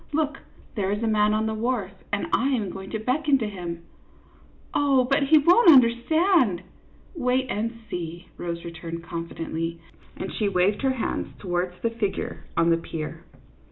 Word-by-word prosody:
Look, 300 Hz, -1 st, 0 dB, 0.3 s
there 195 Hz, -3 st, -1 dB
is 205 Hz, +2 st, -2 dB
a -, -, +1 dB
man 210 Hz, -1 st, +3 dB
on 215 Hz, +1 st, +1 dB
the 220 Hz, -, -1 dB
wharf, 220 Hz, -3 st, -1 dB, 0.2 s
and 205 Hz, 0 st, 0 dB
I 265 Hz, -, +3 dB
am 225 Hz, -9 st, 0 dB
going 195 Hz, 0 st, -8 dB
to 220 Hz, -, -2 dB
beckon 275 Hz, +6 st, +2 dB
to 225 Hz, -4 st, -2 dB
him." 175 Hz, -4 st, -6 dB, 0.5 s
" -, -, -29 dB
Oh, 275 Hz, -3 st, +3 dB
but 275 Hz, +2 st, +1 dB
he 310 Hz, +2 st, +7 dB
won't 350 Hz, +8 st, +6 dB
understand! 255 Hz, -, +4 dB, 0.2 s
" -, -, -30 dB
" -, -, -29 dB
Wait 255 Hz, -3 st, +1 dB
and 225 Hz, +2 st, -1 dB, 0.2 s
see," 170 Hz, 0 st, -6 dB
Rose 170 Hz, -1 st, -5 dB
returned, 170 Hz, 0 st, -6 dB
confidently, 165 Hz, -1 st, -4 dB, 0.4 s
and 190 Hz, -, -5 dB
she 210 Hz, -2 st, 0 dB
waved 190 Hz, +2 st, +2 dB
her 265 Hz, -1 st, +2 dB
hand 250 Hz, -, -3 dB
towards 180 Hz, -1 st, -2 dB
the 230 Hz, -, +1 dB
figure 220 Hz, -4 st, -3 dB
on 170 Hz, 0 st, +4 dB
the 165 Hz, -, +4 dB
pier. 160 Hz, -2 st, -6 dB
210 Hz, 180 wpm, -25 LUFS, 175-255 Hz, 0.5 s, he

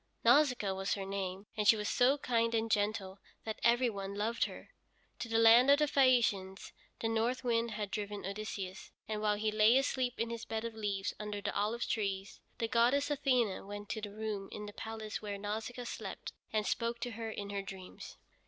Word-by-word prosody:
Nausicaa 250 Hz, -9 st, +4 dB
was 195 Hz, +1 st, -1 dB
her 195 Hz, -1 st, -4 dB
name, 195 Hz, 0 st, -4 dB
and 210 Hz, -1 st, 0 dB
she 225 Hz, -, +8 dB
was 210 Hz, -1 st, -3 dB
so 260 Hz, +3 st, +4 dB
kind 230 Hz, -4 st, +1 dB
and 225 Hz, 0 st, 0 dB
gentle 205 Hz, -2 st, 0 dB, 0.2 s
that 220 Hz, 0 st, -4 dB
every 240 Hz, +2 st, +4 dB
one 200 Hz, -3 st, -4 dB
loved 220 Hz, +3 st, 0 dB
her. -, -, -9 dB, 0.5 s
To 235 Hz, -, -4 dB
the 225 Hz, -, +2 dB
land 230 Hz, +3 st, +7 dB
of 285 Hz, -, +8 dB
the 300 Hz, -, +3 dB
Phæacians 235 Hz, -9 st, +2 dB, 0.3 s
the 225 Hz, -, +1 dB
north 230 Hz, +3 st, 0 dB
wind 235 Hz, -1 st, +1 dB
had 210 Hz, -2 st, -4 dB
driven 205 Hz, -1 st, -4 dB
Odysseus, 195 Hz, -1 st, -5 dB, 0.2 s
and 215 Hz, -1 st, -3 dB
while 210 Hz, -1 st, +2 dB
he 215 Hz, +1 st, 0 dB
lay 215 Hz, +3 st, +5 dB
asleep 260 Hz, -2 st, 0 dB
in 230 Hz, 0 st, -1 dB
his 230 Hz, -1 st, -5 dB
bed 225 Hz, 0 st, -3 dB
of 230 Hz, -, -4 dB
leaves 205 Hz, -3 st, -2 dB
under 210 Hz, -1 st, -4 dB
the -, -, -3 dB
olive 215 Hz, +4 st, 0 dB
trees, 195 Hz, -2 st, -2 dB, 0.2 s
the 230 Hz, -, -1 dB
goddess 250 Hz, +6 st, +3 dB
Athene 250 Hz, -9 st, +1 dB
went 205 Hz, 0 st, -7 dB
to 220 Hz, -, -3 dB
the 210 Hz, -, -5 dB
room 210 Hz, -2 st, -4 dB
in 210 Hz, -, -6 dB
the 205 Hz, -, -8 dB
palace 220 Hz, -1 st, -5 dB
where 205 Hz, -1 st, -4 dB
Nausicaa 220 Hz, +4 st, -4 dB
slept, -, -, -6 dB, 0.2 s
and 215 Hz, -1 st, 0 dB
spoke 235 Hz, +2 st, -1 dB
to 245 Hz, -, -2 dB
her 225 Hz, 0 st, -5 dB
in 200 Hz, -2 st, -5 dB
her 200 Hz, -1 st, -2 dB
dreams. 190 Hz, -1 st, -9 dB
220 Hz, 200 wpm, -33 LUFS, 205-235 Hz, 0.5 s, she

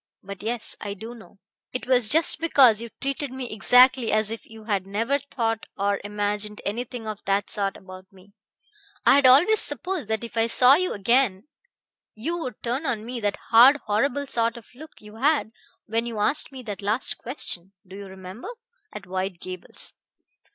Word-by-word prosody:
"But 200 Hz, 0 st, -9 dB
yes 230 Hz, +2 st, -3 dB
I 200 Hz, -1 st, -5 dB
do 225 Hz, +4 st, -9 dB
know. 225 Hz, -3 st, -16 dB, 0.4 s
It 250 Hz, -, -4 dB
was 250 Hz, -4 st, +3 dB
just 325 Hz, +5 st, +6 dB
because 260 Hz, -9 st, +4 dB
you 235 Hz, -, -7 dB
treated 275 Hz, 0 st, -3 dB
me 260 Hz, -2 st, -6 dB
exactly 250 Hz, +3 st, +4 dB
as 215 Hz, 0 st, +1 dB
if 225 Hz, -, -7 dB
you 220 Hz, 0 st, -13 dB
had 200 Hz, -3 st, -2 dB
never 230 Hz, +8 st, -1 dB
thought 230 Hz, -5 st, -3 dB
or 200 Hz, 0 st, -1 dB
imagined 210 Hz, 0 st, -2 dB
anything 235 Hz, +2 st, -4 dB
of 215 Hz, -1 st, -6 dB
that 200 Hz, +1 st, 0 dB
sort 195 Hz, -2 st, 0 dB
about 185 Hz, 0 st, -13 dB
me. 195 Hz, +1 st, -20 dB, 0.7 s
I -, -, +7 dB
had 280 Hz, -1 st, +5 dB
always 345 Hz, +12 st, +6 dB
supposed 345 Hz, -, -3 dB
that 220 Hz, +1 st, -2 dB
if 235 Hz, 0 st, -8 dB
I 225 Hz, 0 st, +3 dB
saw 250 Hz, +3 st, +6 dB
you 365 Hz, +5 st, +1 dB
again 230 Hz, +1 st, +1 dB, 0.7 s
you 320 Hz, +11 st, -3 dB
would 255 Hz, -8 st, -7 dB
turn 255 Hz, +6 st, -2 dB
on 225 Hz, -4 st, -2 dB
me 245 Hz, +1 st, -5 dB
that 205 Hz, -2 st, -2 dB
hard, 245 Hz, +5 st, +8 dB
horrible 245 Hz, +7 st, 0 dB
sort 230 Hz, -3 st, 0 dB
of 230 Hz, -, -12 dB
look 305 Hz, +5 st, -14 dB
you 210 Hz, +1 st, -13 dB
had 280 Hz, -2 st, +1 dB, 0.3 s
when 230 Hz, +2 st, -2 dB
you 230 Hz, -2 st, -6 dB
asked 280 Hz, +10 st, 0 dB
me 260 Hz, -2 st, -10 dB
that 210 Hz, -4 st, -6 dB
last 210 Hz, +5 st, +1 dB
question 195 Hz, -, -4 dB
do 185 Hz, -, -11 dB
you 200 Hz, 0 st, -9 dB
remember? 190 Hz, -, -10 dB, 0.4 s
at 210 Hz, -, -9 dB
White 185 Hz, 0 st, -4 dB
Gables. 185 Hz, 0 st, -6 dB
225 Hz, 185 wpm, -24 LUFS, 205-255 Hz, 0.7 s, hard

